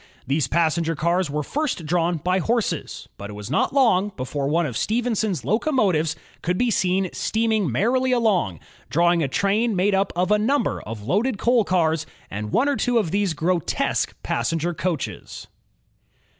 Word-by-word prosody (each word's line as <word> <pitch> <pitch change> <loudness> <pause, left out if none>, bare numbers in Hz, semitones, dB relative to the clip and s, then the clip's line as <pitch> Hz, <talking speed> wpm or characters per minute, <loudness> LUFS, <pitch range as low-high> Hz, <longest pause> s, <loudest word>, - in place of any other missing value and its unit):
These 140 0 0
passenger 165 +1 +1
cars 170 +3 0
were 150 +1 -2
first 285 - -2
drawn 170 +1 +1
by 180 +5 0
horses, 230 +4 -2
but 100 - -7
it - - -7
was 105 +4 -7
not 155 - +1
long 225 -8 +3
before 135 +2 -3
one 165 +4 +1
of 130 -6 -4
Stephenson's 220 - -1
locomotives 205 - +1 0.3
could 180 +1 -1
be 245 +2 +1
seen 185 -1 +1
steaming 220 - 0
merrily 255 - +1
along, 200 - +1 0.3
drawing 170 +5 +3
a 145 - +1
train 205 - +1
made 195 +3 +2
up 195 0 +1
of 180 +3 0
a 210 - +4
number 275 +7 0
of 110 -1 -7
loaded 205 - 0
coal 240 0 +3
cars 160 -5 +1 0.2
and 105 +1 -5
one 270 - +2
or 285 -2 +1
two 245 -1 +1
of 200 -8 0
these 200 -4 0
grotesque 170 +1 0
pas - - -1
senger 165 +1 -1
coaches. 170 -4 -4
180 Hz, 170 wpm, -23 LUFS, 155-220 Hz, 0.3 s, a